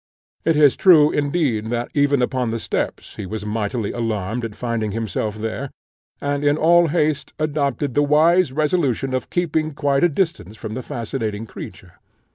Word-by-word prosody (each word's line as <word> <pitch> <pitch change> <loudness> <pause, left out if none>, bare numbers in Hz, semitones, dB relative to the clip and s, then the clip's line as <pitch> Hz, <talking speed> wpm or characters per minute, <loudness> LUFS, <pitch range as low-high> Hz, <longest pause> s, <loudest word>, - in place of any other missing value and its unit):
It 165 - +3
is 150 -3 +5
true, 155 -6 +6
indeed, 145 -7 0
that 120 +1 -2
even 140 -2 +2
upon 125 -1 -1
the 115 - -2
steps - - -4
he 100 - -5
was 105 +1 -5
mightily 105 +1 -2
alarmed 115 0 -2
at 110 -3 -5
finding 115 -4 -2
himself 110 -1 -2
there, 110 +5 -4 0.5
and 145 0 -2
in 145 +1 +3
all 170 +2 +5
haste 155 -2 0
adopted 145 -3 -1
the 145 - +3
wise 155 +3 +4
resolution 140 -3 0
of 130 - -2
keeping 155 -3 -1
quite 140 0 +1
at - - +7
a - - +3
distance 155 - -2
from 110 - -6
the 130 - -4
fascinating 115 -3 -4
creature. - - -11
135 Hz, 170 wpm, -21 LUFS, 115-150 Hz, 0.5 s, at